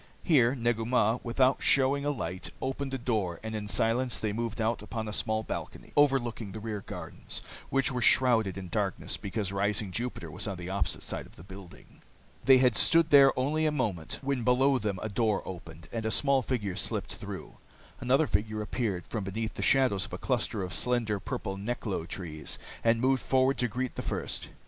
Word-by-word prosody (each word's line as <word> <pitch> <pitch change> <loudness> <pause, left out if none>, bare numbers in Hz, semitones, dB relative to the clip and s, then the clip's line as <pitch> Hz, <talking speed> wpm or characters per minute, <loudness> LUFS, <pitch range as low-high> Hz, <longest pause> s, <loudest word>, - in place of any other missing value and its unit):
Here 135 -7 +4
Negu 120 -2 0
Mah, 115 -1 +2
without 130 +2 +2
showing 140 +1 +3
a - - +2
light, 95 -10 -3
opened 135 +1 -3
a 135 - -1
door, 110 -9 -1
and 110 0 -4
in 105 -1 -4
silence 115 +3 +1
they 110 -2 -2
moved 115 0 -3
out 115 0 0
upon 110 +1 -5
a 105 - -4
small 110 0 0
balcony - - -6
overlooking 120 -8 +2
the 110 - -5
rear 110 -2 -4
gardens, - - -7 0.3
which 135 0 +1
were 125 -1 -2
shrouded 115 -5 +4
in 95 -1 -6
darkness - - -1
because 100 -1 -3
rising 100 0 0
Jupiter 115 -7 -4
was 90 +6 -2
on 100 -2 -3
the 90 +1 -6
opposite 95 -6 -1
side - - -4
of - - -20
the 80 - -13
building. 95 -1 -13 0.4
They 130 -1 +8
had 125 -3 +4
stood 165 -1 +5
there 140 -2 +8
only 155 +4 +1
a - - +2
moment 105 - -2
when 135 -3 -1
below 130 +2 +3
them 105 -3 -2
a - - -1
door 110 -1 0
opened, 85 -3 -9
and 115 -1 -3
a 110 - 0
small 140 +3 +3
figure 105 -7 -2
slipped - - -2
through. - - -8 0.4
Another 135 +5 +3
figure 110 -3 -1
appeared 105 -5 -2
from 110 -3 -3
beneath 110 +3 -3
the - - -6
shadows 130 -8 +3
of - - -15
a - - -2
cluster 105 -4 -1
of 90 - -4
slender, 115 -4 +1
purple 95 +1 -4
neklo 100 -5 -3
trees 80 -5 -4 0.3
and 115 0 +3
moved 130 0 +3
forward 130 +1 +2
to 125 - +2
greet 125 +3 -3
the - - -4
first. - - -3
115 Hz, 195 wpm, -29 LUFS, 100-130 Hz, 0.4 s, They